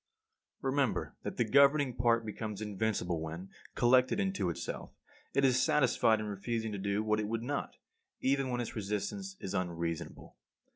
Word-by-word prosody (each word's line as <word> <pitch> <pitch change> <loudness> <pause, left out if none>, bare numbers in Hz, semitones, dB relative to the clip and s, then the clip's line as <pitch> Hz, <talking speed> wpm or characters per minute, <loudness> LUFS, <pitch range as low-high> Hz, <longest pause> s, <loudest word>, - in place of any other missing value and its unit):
48. 135 - 0
Remember 140 -4 0
that - - -5
the - - +3
governing 140 +2 +5
part 115 -1 +2
becomes 105 -1 -5
invincible 105 -5 -1
when, 80 +4 -6 0.2
collected 125 +6 +4
into 190 - 0
itself, 85 - -5 0.4
it 140 - +4
is 130 -1 +4
satisfied 120 -6 +3
in 110 - -3
refusing 110 +2 -3
to 100 - -4
do 100 +2 0
what 110 0 +1
it 105 - -1
would 115 +1 -2
not, 140 +3 -3 0.4
even 135 0 +1
when 120 -1 -1
its 120 - -5
resistance 110 - -3
is 95 - -5
unreasonable. 85 -2 -3
110 Hz, 160 wpm, -32 LUFS, 100-130 Hz, 0.4 s, governing